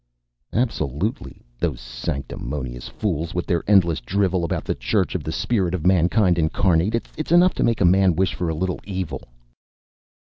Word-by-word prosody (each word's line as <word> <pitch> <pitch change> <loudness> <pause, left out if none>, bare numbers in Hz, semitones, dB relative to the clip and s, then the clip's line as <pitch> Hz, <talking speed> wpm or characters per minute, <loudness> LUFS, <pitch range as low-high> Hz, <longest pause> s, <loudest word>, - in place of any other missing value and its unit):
"Absolutely. 105 - -2 0.2
Those 80 -8 -1
sanctimonious 60 +1 -5
fools 85 -5 -3
with 90 - -1
their 85 -2 0
endless 90 -6 +4
drivel 95 +5 0
about 85 - -2
the - - 0
Church - - 0
of - - -3
the - - -3
Spirit 95 -7 0
of 85 -2 -5
Mankind 90 0 +3
Incarnate. 90 +6 +1
It's 155 +1 -4
enough 175 +1 +6
to - - -1
make 115 -3 +1
a - - +5
man 95 0 +4
wish 95 +2 +1
for 90 -2 -2
a 80 - -2
little 90 +3 -2
evil...." 95 -2 -4
90 Hz, 165 wpm, -22 LUFS, 80-100 Hz, 0.2 s, enough